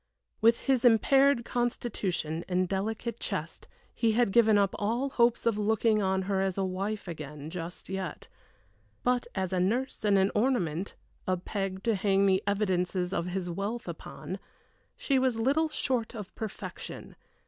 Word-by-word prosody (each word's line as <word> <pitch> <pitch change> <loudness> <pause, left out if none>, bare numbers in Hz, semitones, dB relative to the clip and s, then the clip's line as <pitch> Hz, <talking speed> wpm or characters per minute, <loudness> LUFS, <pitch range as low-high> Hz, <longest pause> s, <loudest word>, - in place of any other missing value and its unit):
With 230 +1 +5
his 265 -3 +2
impaired 255 +2 +5
constitution 200 -9 -2
and 185 0 +1
delicate 215 +4 -2
chest - - -4 0.3
he 225 -2 +2
had 235 -2 +3
given 220 -1 +5
up 200 -1 +2
all 235 +7 0
hopes 235 -2 +2
of 225 -3 +2
looking 215 0 +2
on 190 -1 +1
her 190 0 0
as 195 -1 -1
a 195 - +1
wife 195 +3 -3
again, 150 -2 -7
just 175 0 -6
yet; 190 -4 -5 0.8
but, 250 -1 +1
as 190 -1 -1
a 185 - +1
nurse 230 +10 0
and 205 -2 +4
an 190 +1 +3
ornament 200 - 0 0.3
a 185 0 +2
peg 195 +1 -4
to 230 - +2
hang 195 0 +2
the 190 0 +3
evidences 185 -3 0
of 170 - -1
his 180 0 -3
wealth 200 +7 -3
upon - - -6 0.6
she 275 -2 +2
was 255 -3 +1
little 285 +8 +2
short 250 -5 -1
of 210 -4 -7
perfection. 220 -3 -7
205 Hz, 160 wpm, -29 LUFS, 185-235 Hz, 0.8 s, With